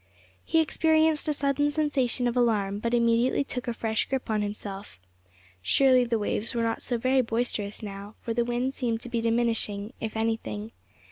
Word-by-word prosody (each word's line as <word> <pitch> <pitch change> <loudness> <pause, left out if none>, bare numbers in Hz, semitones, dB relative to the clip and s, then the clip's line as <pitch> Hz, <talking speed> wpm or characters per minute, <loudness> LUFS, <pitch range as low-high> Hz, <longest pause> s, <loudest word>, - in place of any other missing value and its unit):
He 325 - +3
experienced 315 0 +2
a 300 - +2
sudden 285 0 +1
sensation 280 -5 0
of 240 - -1
alarm, 210 -5 +1
but 235 +2 0
immediately 235 +3 +3
took 250 -2 -6
a - - +1
fresh 220 -1 -1
grip 265 -3 -2
on 215 -1 +1
himself. 205 - -6 0.6
Surely 255 - +4
the 235 -1 0
waves 215 +2 -1
were 230 - +1
not 225 0 -1
so 240 - -1
very 255 +3 +3
boisterous 225 -3 -2
now, 200 +1 -7
for 230 - -3
the 235 +1 +1
wind 245 +2 -1
seemed 235 -4 -2
to 245 - -7
be 235 -1 -1
diminishing, 225 -2 0
if 220 0 -4
anything. 225 -1 -2
235 Hz, 180 wpm, -27 LUFS, 220-255 Hz, 0.6 s, Surely